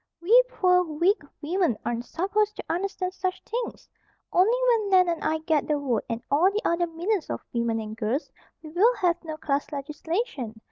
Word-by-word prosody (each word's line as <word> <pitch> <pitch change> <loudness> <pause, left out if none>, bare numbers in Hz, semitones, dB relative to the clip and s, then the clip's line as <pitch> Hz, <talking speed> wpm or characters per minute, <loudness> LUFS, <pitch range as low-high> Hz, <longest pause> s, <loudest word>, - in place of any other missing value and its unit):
"We 445 +9 +6
poor, 360 -6 +3
weak 345 +6 +1 0.2
women 335 - +1
aren't 240 0 -2
supposed 415 +7 0
to - - -6
understand 370 +1 -2
such 370 -1 -2
things. 475 +1 -5 0.5
Only 415 +7 +4
when 440 -4 +2
Nan 365 -2 +5
and 335 -1 -2
I 315 - +1
get 310 -4 +1
the 300 - +1
vote, 255 -6 -1
and 230 0 -3
all 320 +7 +5
the 415 +2 -2
other 345 +1 +1
millions 345 +3 -2
of - - -4
women 235 -1 0
and 215 0 -6
girls, 225 +7 -2 0.3
we 310 - -9
will 430 +9 +4
have 350 -5 0
no 315 -2 -6
class 285 -2 -1
legislation. 295 - -4
340 Hz, 185 wpm, -26 LUFS, 285-390 Hz, 0.5 s, We